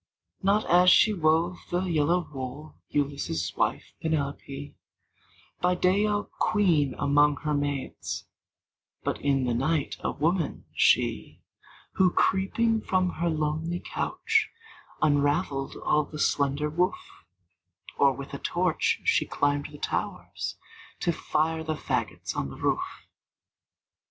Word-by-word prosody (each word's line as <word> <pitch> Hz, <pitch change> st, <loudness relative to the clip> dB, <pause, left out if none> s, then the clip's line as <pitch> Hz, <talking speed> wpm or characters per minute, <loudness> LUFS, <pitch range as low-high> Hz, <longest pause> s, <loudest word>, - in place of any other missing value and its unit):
Not 200 Hz, +3 st, +2 dB
as 180 Hz, +1 st, +6 dB
she 215 Hz, -, +6 dB
wove 165 Hz, 0 st, +2 dB
the 175 Hz, +1 st, 0 dB
yellow 170 Hz, 0 st, +1 dB
wool, 135 Hz, +3 st, -6 dB, 0.2 s
Ulysses' 140 Hz, -, -1 dB
wife, -, -, -1 dB
Penelope; 145 Hz, -2 st, -3 dB, 0.9 s
By 180 Hz, 0 st, +2 dB
day 190 Hz, +4 st, +3 dB
a 205 Hz, 0 st, 0 dB
queen 165 Hz, -, +1 dB
among 145 Hz, +1 st, +3 dB
her 150 Hz, -1 st, -1 dB
maids, 145 Hz, -2 st, -3 dB, 0.8 s
But -, -, -2 dB
in 135 Hz, -2 st, +2 dB
the 125 Hz, -1 st, 0 dB
night 145 Hz, +4 st, 0 dB
a -, -, -2 dB
woman, 165 Hz, +2 st, -1 dB
she, -, -, +2 dB, 0.5 s
Who, 185 Hz, -1 st, +5 dB
creeping 220 Hz, +5 st, +1 dB
from 185 Hz, -2 st, +1 dB
her 170 Hz, +1 st, +1 dB
lonely 160 Hz, +2 st, -1 dB
couch, 445 Hz, -, 0 dB, 0.5 s
Unraveled 145 Hz, -1 st, +1 dB
all 150 Hz, 0 st, +1 dB
the 150 Hz, -, -9 dB
slender 140 Hz, 0 st, +1 dB
woof; 180 Hz, -, +1 dB, 1.0 s
Or, -, -, +5 dB
with -, -, -8 dB
a -, -, -4 dB
torch, -, -, 0 dB
she 460 Hz, -, +2 dB
climbed 145 Hz, 0 st, 0 dB
the 145 Hz, -, -10 dB
towers, -, -, -3 dB, 0.4 s
To 175 Hz, -, +2 dB
fire 160 Hz, 0 st, -1 dB
the 155 Hz, 0 st, -2 dB
fagots -, -, -3 dB
on 70 Hz, -, -2 dB
the -, -, -10 dB
roof! -, -, -2 dB
155 Hz, 125 wpm, -27 LUFS, 145-180 Hz, 1.0 s, as